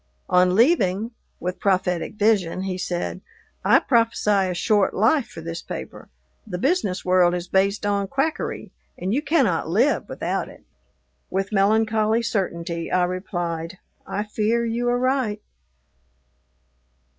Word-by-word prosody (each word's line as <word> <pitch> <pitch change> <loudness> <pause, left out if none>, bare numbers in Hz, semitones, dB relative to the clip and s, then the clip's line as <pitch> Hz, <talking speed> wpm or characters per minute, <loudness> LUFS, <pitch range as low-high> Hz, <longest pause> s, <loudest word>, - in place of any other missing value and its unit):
On 180 0 +4
leaving, 225 - +3 0.3
with 180 +1 -4
prophetic 185 -1 0
vision, 200 -4 +1
he 190 -1 -2
said, 180 0 -3 0.4
"I - - +6
prophesy 225 -5 +2
a - - -1
short 205 +1 +2
life 230 +7 +3
for 165 - -10
this 165 +1 -5
paper; - - -8 0.4
the 180 -4 -4
business 260 - 0
world 180 -1 +4
is 175 0 -4
based 195 +2 +1
on 200 -1 0
quackery, 275 +8 -2 0.3
and 190 +3 -2
you 275 - +1
cannot 270 - +1
live 235 - +2
without - - -3
it." - - -15 0.7
With 195 +2 -2
melancholy 220 +2 +2
certainty, 170 -6 -2
I 180 0 +3
replied, 175 -1 -3 0.3
"I 205 - -2
fear 220 +2 0
you 235 +1 -1
are 245 - +2
right." 255 -4 0
200 Hz, 135 wpm, -23 LUFS, 180-230 Hz, 0.7 s, I